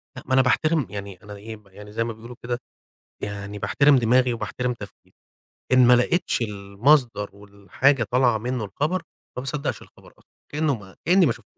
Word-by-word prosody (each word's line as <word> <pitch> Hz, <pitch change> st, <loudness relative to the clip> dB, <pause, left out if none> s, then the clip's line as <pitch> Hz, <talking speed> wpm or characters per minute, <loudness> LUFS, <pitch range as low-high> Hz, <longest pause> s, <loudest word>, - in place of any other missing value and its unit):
لا -, -, -9 dB
ما -, -, -1 dB
أنا 130 Hz, -, +6 dB
باحترم، 150 Hz, +2 st, +2 dB
يعني 100 Hz, -1 st, -8 dB
أنا 105 Hz, 0 st, -9 dB
إيه، 110 Hz, +2 st, -8 dB
ب 105 Hz, -1 st, -20 dB
يعني 105 Hz, +2 st, -13 dB
زي 115 Hz, +2 st, -1 dB
ما 115 Hz, 0 st, -4 dB
بيقولوا 115 Hz, +3 st, -11 dB
كده، 120 Hz, 0 st, -2 dB, 0.6 s
يعني 105 Hz, 0 st, -5 dB
باحترم 140 Hz, +8 st, +4 dB
دماغي، 125 Hz, +1 st, +3 dB
وباحترم 125 Hz, +3 st, -3 dB
تفكيري. 100 Hz, -3 st, -13 dB, 0.6 s
إن 130 Hz, -1 st, +7 dB
ما 125 Hz, -, +7 dB
لقيتش 125 Hz, +2 st, +1 dB
المصدر 105 Hz, +3 st, +1 dB
والحاجة 100 Hz, +7 st, 0 dB
طالعة 125 Hz, -3 st, +3 dB
منه 120 Hz, +1 st, -3 dB
الخبر، 150 Hz, -, -2 dB, 0.3 s
ما -, -, -2 dB
باصدقش 140 Hz, +2 st, -2 dB
الخبر -, -, -18 dB
أصلًا -, -, -27 dB, 0.2 s
كأنه 150 Hz, -1 st, +1 dB
ما 100 Hz, -4 st, -11 dB
كأني 180 Hz, 0 st, +5 dB
ما 125 Hz, -, +3 dB
شفت. -, -, -15 dB
120 Hz, 180 wpm, -24 LUFS, 105-130 Hz, 0.6 s, إن